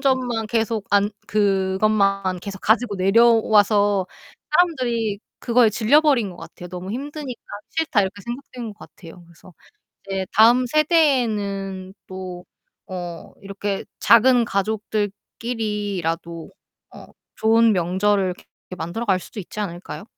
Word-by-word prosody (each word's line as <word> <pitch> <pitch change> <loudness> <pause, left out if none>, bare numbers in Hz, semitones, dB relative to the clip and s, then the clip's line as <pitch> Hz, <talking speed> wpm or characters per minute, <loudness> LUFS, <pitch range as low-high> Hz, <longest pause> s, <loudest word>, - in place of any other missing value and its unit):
점만 255 -5 0
계속 225 -2 -1
안 205 0 +3 0.2
그것만 195 -1 +1
계속 195 0 -7
가지고 220 0 +2
내려와서 205 -1 +4 0.4
사람들이 250 - +1 0.2
그거에 235 -2 +4
질려버린 240 0 +3
것 175 - -12
같아요. 175 0 -11
'너무 180 +1 -7
힘드니까 280 0 -6 0.3
싫다.' 320 -9 +1
이렇게 195 +1 -4
생각되는 240 -1 -7
것 - - -38
같아요. 175 -3 -14
그래서 170 +2 -18 0.5
이제 195 -1 -3
다음 235 +4 +6
세대에는 220 - +1
또 185 -1 -8 0.5
어 175 -2 -7
이렇게 200 0 -4
작은 240 +1 +5
가족들끼리라도 205 -4 -3 0.4
어 - - -11 0.3
좋은 225 +1 +4
명절을 190 +2 +1
이렇게 - - -17 0.3
만들어갈 190 +4 -1
수도 205 - -10
있지 205 +2 -6
않을까요? 180 0 -6
210 Hz, 290 characters per minute, -22 LUFS, 190-235 Hz, 0.5 s, 다음